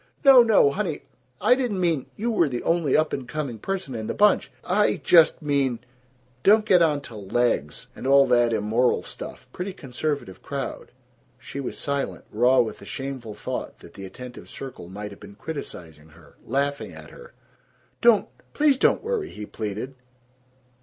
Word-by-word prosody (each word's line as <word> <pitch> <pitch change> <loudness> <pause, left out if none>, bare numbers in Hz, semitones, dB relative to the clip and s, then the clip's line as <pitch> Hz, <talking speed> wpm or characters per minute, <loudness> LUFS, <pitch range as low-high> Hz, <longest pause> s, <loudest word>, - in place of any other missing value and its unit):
"No! 270 -2 +10
No! 220 -11 +5
Honey, 175 -2 -3 0.4
I - - +5
didn't 245 -7 -1
mean 165 -7 0
You 235 +3 -1
were 170 -9 +2
the 120 -2 -4
only 165 -5 +2
up 155 0 +1
and 130 -3 -4
coming 135 -5 -4
person 185 - -4
in 110 -2 -4
the - - -3
bunch. 210 0 +3
I 205 +3 +2
just 165 -2 +4
mean 140 -4 +1 0.6
Don't 210 +5 +5
get 185 -4 +5
onto 145 -6 +1
legs 100 -7 -1
and - - -6
all 140 0 +6
that 120 -2 +3
immoral 110 +3 +1
stuff. - - -8
Pretty 185 +2 -4
conservative 140 - -4
crowd." 140 -1 -5 0.5
She 135 +1 -8
was 135 - -5
silent, 140 -1 -3
raw 125 +4 +4
with 115 - -4
the - - -12
shameful 130 -5 -6
thought 105 - -5
that - - -15
the 95 - -9
attentive 125 +5 -10
circle 130 -10 -8
might 105 +2 -7
have 100 - -12
been 100 -1 -12
criticizing 80 - -8
her, 80 -1 -19
laughing 140 +3 -1
at - - -12
her. 480 0 -14 0.7
"Don't, 235 -4 +5 0.3
please 290 -3 +3
don't - - +3
worry!" 450 -4 -2
he 105 - -8
pleaded. 110 +5 -5
140 Hz, 165 wpm, -24 LUFS, 115-180 Hz, 0.7 s, No